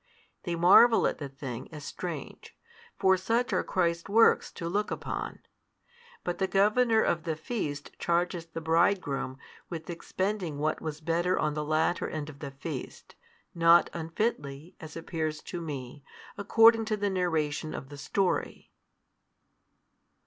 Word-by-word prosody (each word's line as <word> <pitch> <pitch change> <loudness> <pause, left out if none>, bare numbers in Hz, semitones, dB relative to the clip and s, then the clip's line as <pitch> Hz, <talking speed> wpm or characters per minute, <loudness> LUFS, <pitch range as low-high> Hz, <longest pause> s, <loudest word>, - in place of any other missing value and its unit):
They 175 -2 -1
marvel 190 +7 +6
at - - 0
the 145 -2 -5
thing, 135 -2 -7
as 150 -2 -8
strange; 165 -4 -7 0.4
for 190 -1 +4
such 230 +7 0
are - - +2
Christ's 170 -1 -1
works 225 +3 +4
to 170 - -5
look 205 +4 -1
upon. - - -5 0.8
But 175 -1 -3
the 190 - +1
governor 220 +4 +3
of 170 - +1
the 160 -1 -2
feast 155 -5 -4
charges 170 0 0
the 165 0 -7
bridegroom 160 -5 +1 0.3
with 165 -2 -6
expending 185 -1 -3
what 155 +2 -1
was 155 -1 -5
better 170 +3 +1
on 150 -1 0
the 150 0 -2
latter 155 +3 0
end 155 -1 -5
of 140 - -17
the 140 - -5
feast, 135 0 -7 0.4
not 170 0 +5
unfitly, 165 -3 -3
as 160 0 -9
appears 160 -2 -3
to 175 - -6
me, 140 -3 -6 0.3
according 225 +2 +5
to 215 -1 -1
the 205 -1 0
narration 160 -4 -1
of 135 - -7
the 145 - -9
story. 195 +5 -1
170 Hz, 145 wpm, -29 LUFS, 150-190 Hz, 0.8 s, marvel